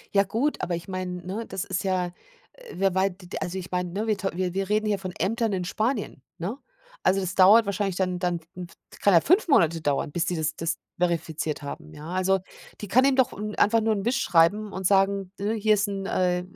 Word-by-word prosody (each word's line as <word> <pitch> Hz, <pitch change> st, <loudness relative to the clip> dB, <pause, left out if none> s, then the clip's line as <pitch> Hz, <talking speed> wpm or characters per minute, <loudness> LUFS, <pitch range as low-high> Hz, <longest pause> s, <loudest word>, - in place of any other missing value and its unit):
Ja 200 Hz, -, +6 dB
gut, 235 Hz, +9 st, -1 dB
aber 180 Hz, -1 st, -1 dB
ich 170 Hz, 0 st, -7 dB
meine, 180 Hz, -2 st, -5 dB
ne, 205 Hz, +5 st, -4 dB
das 190 Hz, -1 st, -4 dB
ist 190 Hz, -2 st, -2 dB
ja, 185 Hz, -2 st, 0 dB, 0.5 s
äh -, -, -13 dB
wer 195 Hz, 0 st, +1 dB
wei 190 Hz, +1 st, +2 dB
d 185 Hz, 0 st, -14 dB
d 175 Hz, -, -6 dB
also 185 Hz, 0 st, -3 dB
ich 185 Hz, -1 st, -7 dB
meine, 180 Hz, 0 st, -1 dB
ne, 210 Hz, +3 st, -2 dB
wir 215 Hz, -, +1 dB
tau 195 Hz, 0 st, -2 dB
wir 185 Hz, -1 st, -1 dB
wir 195 Hz, 0 st, -2 dB
reden 215 Hz, +1 st, +1 dB
hier 205 Hz, -2 st, 0 dB
von 185 Hz, -1 st, -5 dB
Ämtern 225 Hz, +3 st, 0 dB
in 180 Hz, -2 st, -2 dB
Spanien, 215 Hz, -, -2 dB, 0.2 s
ne? 195 Hz, +9 st, -4 dB, 0.5 s
Also, 190 Hz, +1 st, +4 dB
das 185 Hz, -1 st, -3 dB
dauert 205 Hz, +5 st, +7 dB
wahrscheinlich 200 Hz, -1 st, -1 dB
dann 180 Hz, -1 st, -1 dB
dann 175 Hz, -1 st, -1 dB
w 180 Hz, 0 st, -7 dB
d -, -, -19 dB
kann 200 Hz, -, +4 dB
ja 165 Hz, -, +7 dB
5 365 Hz, +7 st, +3 dB
Monate 170 Hz, -, +3 dB
dauern, 145 Hz, -1 st, 0 dB
bis 170 Hz, +2 st, -1 dB
die 175 Hz, +1 st, -1 dB
das 155 Hz, -1 st, -1 dB
das 165 Hz, 0 st, -2 dB, 0.2 s
verifiziert 160 Hz, -3 st, -1 dB
haben, 150 Hz, +2 st, -7 dB
ja? 150 Hz, +1 st, -10 dB
Also, 190 Hz, +1 st, +2 dB, 0.4 s
die 205 Hz, -, -6 dB
kann 255 Hz, +7 st, +4 dB
ihm 275 Hz, -, +3 dB
doch 260 Hz, -1 st, +2 dB
n 210 Hz, +1 st, -5 dB
einfach 225 Hz, +2 st, +3 dB
nur 220 Hz, 0 st, +2 dB
'n 200 Hz, +1 st, -4 dB
Wisch 260 Hz, +3 st, +1 dB
schreiben 200 Hz, +6 st, +3 dB
und 190 Hz, -1 st, -5 dB
sagen, 195 Hz, -1 st, +2 dB
ne, 205 Hz, +2 st, -1 dB
hier 215 Hz, -1 st, +3 dB
ist 205 Hz, 0 st, +1 dB
'n, 195 Hz, -1 st, -4 dB
äh 180 Hz, -2 st, +1 dB
190 Hz, 245 wpm, -26 LUFS, 180-210 Hz, 0.5 s, dauert